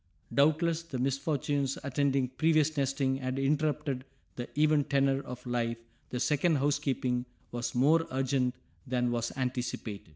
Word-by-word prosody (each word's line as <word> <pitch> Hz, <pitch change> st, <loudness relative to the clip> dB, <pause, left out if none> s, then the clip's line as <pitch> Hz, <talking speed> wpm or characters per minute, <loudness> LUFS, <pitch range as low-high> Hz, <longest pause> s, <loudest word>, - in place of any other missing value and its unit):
Doubtless 160 Hz, +3 st, +3 dB
the 165 Hz, -6 st, -6 dB
misfortunes 140 Hz, +1 st, 0 dB
attending 140 Hz, -2 st, +1 dB
previous 155 Hz, +2 st, +2 dB
nesting 135 Hz, -1 st, +1 dB
had 130 Hz, 0 st, -3 dB
interrupted 145 Hz, -1 st, 0 dB, 0.3 s
the 120 Hz, -, -5 dB
even 155 Hz, -1 st, +4 dB
tenor 140 Hz, -1 st, +2 dB
of 125 Hz, -2 st, -9 dB
life, 120 Hz, -1 st, -1 dB, 0.3 s
the 125 Hz, -, -3 dB
second 150 Hz, +5 st, +2 dB
housekeeping 135 Hz, -3 st, 0 dB, 0.2 s
was 120 Hz, 0 st, -3 dB
more 155 Hz, +6 st, +4 dB
urgent 130 Hz, -1 st, 0 dB, 0.3 s
than 125 Hz, -1 st, +1 dB
was 120 Hz, -1 st, -1 dB
anticipated. 125 Hz, -7 st, -3 dB
135 Hz, 130 wpm, -30 LUFS, 125-145 Hz, 0.3 s, even